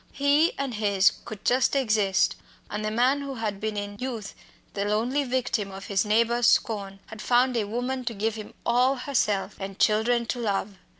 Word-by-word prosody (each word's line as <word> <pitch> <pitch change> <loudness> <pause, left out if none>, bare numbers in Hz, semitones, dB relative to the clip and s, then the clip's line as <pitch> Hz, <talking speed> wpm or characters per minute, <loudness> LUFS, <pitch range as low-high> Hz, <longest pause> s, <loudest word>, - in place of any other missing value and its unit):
He 285 +4 +3
and 275 -3 -3
his 205 -2 +3
could 215 -3 -9
just 255 +2 +3
exist, 215 -7 +2 0.4
and 210 +1 -3
the 215 - 0
man 250 +6 +2
who 275 -1 -5
had 215 -4 -3
been 215 -1 -2
in 205 0 -5
youth 240 -6 -5 0.4
the 200 - -2
lonely 230 +7 0
victim 245 -5 -1
of 195 0 -9
his 195 -1 0
neighbours' 235 +3 +2
scorn 200 -3 +1
had 220 -1 -10
found 250 +2 +3
a 225 -3 +1
woman 250 +4 -3
to 235 -2 -3
give 220 +2 -1
him 215 -1 -9
all 250 +3 +3
herself 235 -7 -1
and 195 0 -6
children 235 +2 +2
to 245 - -3
love. 200 -3 -2
225 Hz, 185 wpm, -26 LUFS, 205-250 Hz, 0.4 s, He